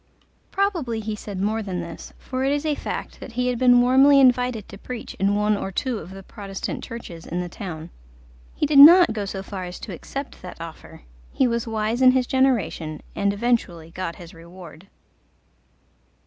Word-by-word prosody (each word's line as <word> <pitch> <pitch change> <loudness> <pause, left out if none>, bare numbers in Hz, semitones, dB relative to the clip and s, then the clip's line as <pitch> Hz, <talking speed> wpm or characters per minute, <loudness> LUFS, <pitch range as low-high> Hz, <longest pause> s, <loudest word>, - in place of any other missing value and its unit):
Probably 340 - -1
he 215 0 -4
said 205 -2 -7
more 215 +3 0
than 190 -4 -4
this: 170 -1 -8
for 260 0 -4
it 270 - +1
is 290 +2 -1
a 305 - +1
fact - - -6
that 245 - -10
he 250 +1 0
had 245 -2 -2
been 245 -1 +6
warmly 270 +3 +6
invited 250 -4 +3
to 200 - -11
preach 245 0 -7
in 200 +1 +2
one 210 +1 +2
or 195 -1 -4
two 240 +4 -2
of 170 - -10
the 195 0 -10
Protestant 195 0 -6
churches 180 -8 -8
in 175 - -3
the 180 - -3
town. 170 -3 -8 0.6
He - - 0
did 290 -1 +4
not 340 -1 +9
go 210 -2 -3
so 195 0 -5
far 190 -2 -6
as 180 0 -8
to 200 - -7
accept 275 - -7
that 180 -2 -10
offer: 165 - -10 0.3
he 265 - +2
was 235 -1 -2
wise 220 +2 -1
in 255 0 +7
his 260 -1 +2
generation, 240 - 0
and 200 0 +1
eventually 200 -7 -1
got 175 -1 -5
his 175 -2 -12
reward. 170 0 -13
215 Hz, 190 wpm, -23 LUFS, 185-255 Hz, 0.6 s, not